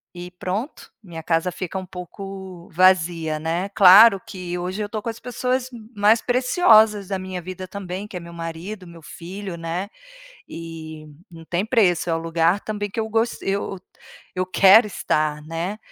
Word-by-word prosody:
e 175 0 -7
pronto, 185 - -5
minha 165 -5 -9
casa 165 +2 0
fica 185 +1 -6
um 185 - -9
pouco 190 0 -9
vazia, 170 -3 +2
né. 170 +4 -2
Claro 200 +1 +8
que 180 -2 -6
hoje 185 +3 -4
eu - - -4
tô 215 -1 -4
com 230 - -4
as 225 - -7
pessoas 250 +1 -2 0.3
mais 210 +3 +4
preciosas 225 - +4
da 195 -1 -2
minha 185 -1 -6
vida 185 +1 -7
também, 190 +1 -6
que 195 - -12
é - - -3
meu 170 0 -11
marido, 170 +4 -7
meu 170 -1 -13
filho, 185 +3 -8
né, 170 +4 -4 0.6
e 160 -2 -9 0.3
não 165 -1 -12
tem 180 +5 -1
preço. 190 -8 +2
É - - +2
o - - 0
lugar 165 +3 +1
também 205 -1 -4
que 225 - -5
eu 220 - -1
gos 225 +2 -1
eu 195 -1 -3 0.6
eu 185 0 0
quero 195 +4 +6
estar, 155 -6 -1
né, 170 +6 -4
185 Hz, 175 wpm, -22 LUFS, 170-205 Hz, 0.6 s, Claro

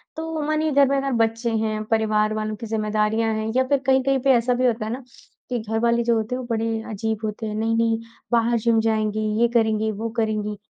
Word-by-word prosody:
तो 320 -1 -4
मानिए 310 0 +1
घर 280 -1 +5
में 275 0 +2
ना 275 0 -2
बच्चे 230 +1 -1
हैं, 215 -1 -1
परिवार 215 -1 +2
वालों 215 0 -3
की 230 - -8
ज़िम्मेदारियाँ 215 +1 0
हैं 220 0 -2
या 260 - +4
फिर 280 -1 +2
कहीं-कहीं 265 0 +3
पे 270 +1 +3
ऐसा 240 +1 +2
भी 255 +1 +1
होता 230 -3 +1
है 220 - -4
ना, 260 +1 -6 0.5
कि 245 -2 -1
घर 220 +1 -2
वाले 235 0 +2
जो 235 0 +2
होते 220 +3 -1
हैं - - -4
वो 250 - -6
बड़े 225 0 -1
अजीब 220 0 -2
होते 215 +1 -4
हैं, 210 - -4
नहीं-नहीं 225 +1 +1 0.3
बाहर 235 0 +3
जिम 225 0 +2
जाएँगी, 215 -1 0 0.2
ये 235 - +5
करेंगी, 220 -1 +2
वो 225 +2 -4
करेंगी, 210 -2 -1
225 Hz, 225 wpm, -23 LUFS, 215-245 Hz, 0.5 s, घर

